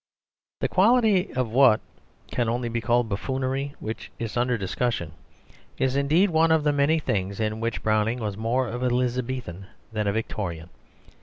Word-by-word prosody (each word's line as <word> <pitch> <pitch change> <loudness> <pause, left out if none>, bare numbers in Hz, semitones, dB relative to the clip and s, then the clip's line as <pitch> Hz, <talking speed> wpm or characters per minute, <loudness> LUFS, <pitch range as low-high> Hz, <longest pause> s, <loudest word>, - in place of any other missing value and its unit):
The - - +2
quality 210 -2 +3
of 125 -3 -1
what, 125 -3 +6 0.5
can 120 -2 0
only 120 +1 -1
be 115 0 -2
called 120 0 +2
buffoonery 130 +6 -2
which 110 +1 -6
is 115 -2 -5
under 120 0 +1
discussion 95 -3 -2 0.7
is 130 0 0
indeed 155 +8 +3
one 160 0 +3
of 160 -2 +3
the 150 -1 +2
many 145 +3 +3
things 100 -9 -2
in 110 0 -1
which 115 0 -3
Browning 110 +2 +1
was 105 -4 -3
more 120 +4 0
of 120 +2 -5
an 125 -1 +1
Elizabethan 125 -6 -2 0.3
than 105 -1 -1
a - - +3
Victorian. 90 -6 -4
120 Hz, 165 wpm, -25 LUFS, 110-135 Hz, 0.7 s, what